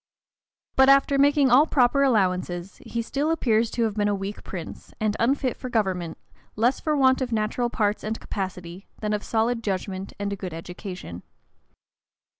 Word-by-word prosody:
But 265 0 +6
after 275 0 +5
making 280 -2 +4
all 280 +6 +6
proper 260 0 +3
allowances, 185 -7 0
he 235 0 -3
still 285 +6 -1
appears 230 -8 +2
to 235 - -1
have 220 -2 0
been 205 0 0
a 205 - +1
weak 195 +1 -6
prince, 175 -4 -8
and 215 -1 0
unfit 255 +1 +1
for 255 - -7
government, 185 -8 -1 0.4
less 240 +5 +2
for 305 -1 0
want 260 -1 +4
of 250 -2 -2
natural 225 +2 0
parts 210 -2 0
and 220 +1 -3
capacity, 185 -1 -6
than 210 -1 -1
of 210 - -2
solid 230 +1 0
judgment 190 -1 -3
and 200 0 -3
a - - -2
good 185 -4 -6
education. 180 - -8
215 Hz, 170 wpm, -25 LUFS, 195-255 Hz, 0.4 s, But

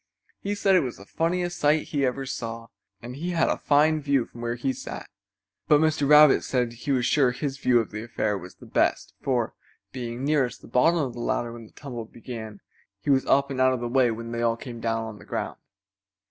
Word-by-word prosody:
He 205 +1 -2
said 195 -1 +2
it - - +6
was 130 -7 -3
the 100 - -13
funniest 175 - -1
sight 150 +1 +2
he 140 -3 +1
ever 135 +2 -3
saw, 115 -2 -5 0.3
and 120 +1 -7
he 170 +6 -4
had 165 - +2
a - - +1
fine 155 +2 +3
view 140 -4 +1
from 120 - -12
where 120 0 -2
he 130 +2 -1
sat. - - -7 0.6
But 150 - +6
Mr. 155 -2 +2
Rabbit 150 -1 +7
said 125 -3 0
he 125 +5 -4
was 125 -3 +2
sure 135 -1 +4
his 135 +2 -4
view 125 -3 +3
of 115 - -3
the 105 0 -5
affair 110 -2 -1
was 90 -2 -8
the - - -15
best, - - 0
for, 125 -4 0 0.4
being 120 0 -5
nearest 140 -4 0
the - - -11
bottom 125 +9 +3
of 135 -6 -1
the 120 - -8
ladder 120 0 -1
when 115 -2 -10
the - - -22
tumble 120 -6 -7
began, 110 -2 -9 0.4
he 140 - 0
was 135 -1 +2
up 140 0 +3
and 130 -1 -1
out 130 0 +5
of 130 - -2
the 120 - -3
way 125 0 +3
when 115 +1 -5
they 120 0 -2
all 115 -1 +1
came 120 0 -8
down 115 0 -1
on 110 -2 -8
the - - -13
ground. - - -4
125 Hz, 230 wpm, -26 LUFS, 115-145 Hz, 0.6 s, Rabbit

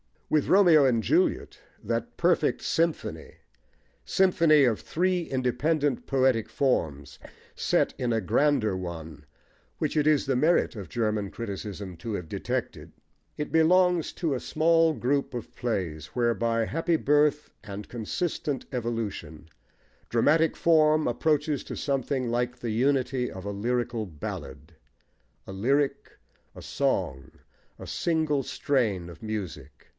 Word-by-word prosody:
With 155 -2 +2
Romeo 175 -7 +6
and 115 -4 +2
Juliet, 365 +3 +1 0.2
that - - -3
perfect - - +2
symphony 165 -1 -2 0.7
(symphony 165 -6 +4
of 120 -5 +2
three 180 +1 0
independent 135 +1 -1
poetic 130 -5 +2
forms 80 - -1 0.3
set - - +1
in 120 -2 0
a 110 - +1
grander 115 -1 +2
one* 80 -5 -7 0.5
which - - -2
it 150 0 +2
is 150 -2 +3
the 135 -2 +1
merit 160 +2 +2
of 100 -5 -7
German 105 -4 -1
criticism 100 -4 -6
to 110 +7 -5
have 90 -5 -5
detected) - - -4 0.4
it 150 - -4
belongs 175 +1 +3
to 160 -5 -1
a 130 - -2
small 165 +2 +3
group 140 +3 -1
of 120 - -7
plays, 90 -10 -3
where, 120 -1 +2
by 115 -1 0
happy 165 +6 0
birth 150 0 +2
and 105 -1 -8
consistent 135 +4 -3
evolution, 115 - -4 0.6
dramatic 155 +7 +3
form 155 -2 +3
approaches 150 +3 0
to - - -6
something 135 -2 -1
like 120 +1 -1
the 120 -2 -4
unity 130 +1 +1
of 95 - -9
a 100 - -3
lyrical 120 +2 -2
ballad, 75 -3 -8 0.7
a - - -8
lyric, 135 +9 -1 0.4
a - - -10
song, 80 - -2 0.5
a - - -9
single 155 -4 0
strain 110 -12 -1
of 85 - -12
music. 110 -5 -7
125 Hz, 130 wpm, -27 LUFS, 105-150 Hz, 0.7 s, Romeo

